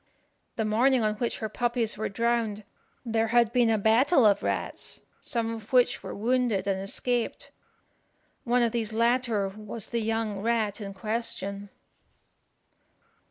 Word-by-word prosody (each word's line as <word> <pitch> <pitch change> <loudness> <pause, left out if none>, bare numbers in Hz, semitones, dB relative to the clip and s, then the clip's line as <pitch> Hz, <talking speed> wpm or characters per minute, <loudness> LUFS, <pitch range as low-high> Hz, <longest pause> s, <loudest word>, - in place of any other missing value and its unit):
The 220 - -1
morning 240 +3 +3
on 215 0 +1
which 235 +1 -2
her 220 - -3
puppies 235 0 -1
were 215 - -3
drowned 230 -1 -1 0.4
there 225 -1 +1
had 235 0 +3
been 245 -2 +4
a 220 - +3
battue 240 - +4
of 200 - -2
rats, - - -3 0.2
some 230 -1 -1
of 220 -2 -9
which 250 -2 +3
were - - -7
wounded 230 -3 +1
and 195 -1 -1
escaped. 240 +4 -1 0.9
One 245 0 +2
of 230 - +1
these 225 -2 -2
latter 230 -3 +1
was 215 +2 -7
the 235 - 0
young 220 -2 -1
rat 220 -1 0
in 195 -1 -6
question. 210 -2 -3
225 Hz, 145 wpm, -27 LUFS, 210-235 Hz, 0.9 s, been